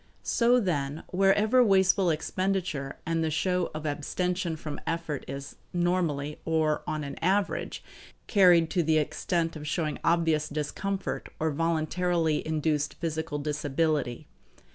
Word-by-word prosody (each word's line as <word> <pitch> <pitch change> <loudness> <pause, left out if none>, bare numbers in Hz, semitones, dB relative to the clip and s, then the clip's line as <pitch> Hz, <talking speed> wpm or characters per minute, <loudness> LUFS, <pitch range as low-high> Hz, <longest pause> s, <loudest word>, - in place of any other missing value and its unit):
So, 245 +1 +3
then, 150 - -2
wherever 205 +6 +4
wasteful 190 -3 +4
expenditure 165 -3 -1
and 165 0 0
the 160 - +1
show 180 +3 0
of 155 0 -5
abstention 175 +4 -1
from 155 -1 -6
effort 165 -4 -2
is 140 +1 -7 0.2
normally, 170 -5 0
or 155 -2 +1
on 155 -1 -2
an 140 - -6
average, 195 +4 0 0.4
carried 175 -5 +5
to 180 - +2
the 160 -1 +2
extent 165 +2 -1
of 150 -1 -7
showing 155 +1 -1
obvious 165 -2 +2
discomfort 190 +7 -3
or 160 0 +1
voluntarily 165 +1 0
induced 150 -2 0
physical 160 -2 -3
disability. 145 -3 -1
160 Hz, 125 wpm, -28 LUFS, 150-180 Hz, 0.4 s, carried